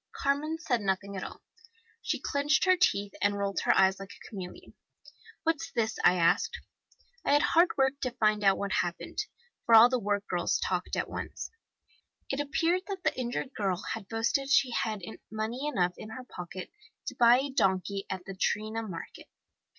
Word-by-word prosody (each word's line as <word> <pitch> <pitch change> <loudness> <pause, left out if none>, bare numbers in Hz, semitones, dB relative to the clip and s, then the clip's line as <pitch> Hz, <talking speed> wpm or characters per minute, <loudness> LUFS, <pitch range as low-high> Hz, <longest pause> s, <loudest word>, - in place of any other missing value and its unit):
Carmen 290 +3 0
said 255 -8 -1
nothing 195 0 -2
at 190 - -4
all. - - -9 0.6
She - - -1
clinched 285 +4 +1
her 370 0 +5
teeth 205 - +1
and 205 0 +2
rolled 200 -1 -1
her - - +4
eyes 190 0 +4
like 195 0 -8
a - - -13
chameleon. 185 -4 -9 0.7
'What's 325 0 -1
this?' 220 -1 -1
I 180 - +6
asked. 450 - +2 0.6
I - - +2
had 290 - +5
hard 340 +2 +4
work 270 +1 +2
to 255 - 0
find 215 -3 +1
out 195 -1 +5
what 200 -1 -3
had - - +2
happened, 175 - -7 0.4
for 230 - +5
all 225 +2 +9
the 255 -1 +1
work 205 -1 -1
girls 175 -1 0
talked - - -2
at - - -1
once. - - -6 0.8
It 270 - -2
appeared 330 +5 +1
that 385 -3 -5
the - - +1
injured 255 +2 -3
girl 195 -4 0 0.2
had 215 -4 -7
boasted 230 +5 0
she 265 -3 +4
had 215 -4 -2 0.3
money 220 +6 -3
enough 180 -11 +1
in 215 - -8
her 255 +4 -7
pocket 180 -5 -8 0.3
to - - -5
buy 240 0 +6
a 275 +2 -2
donkey 195 -4 0
at 185 -1 -5
the 195 - -6
Triana 215 +3 -1
Market. 185 -7 -8
220 Hz, 185 wpm, -29 LUFS, 195-275 Hz, 0.8 s, all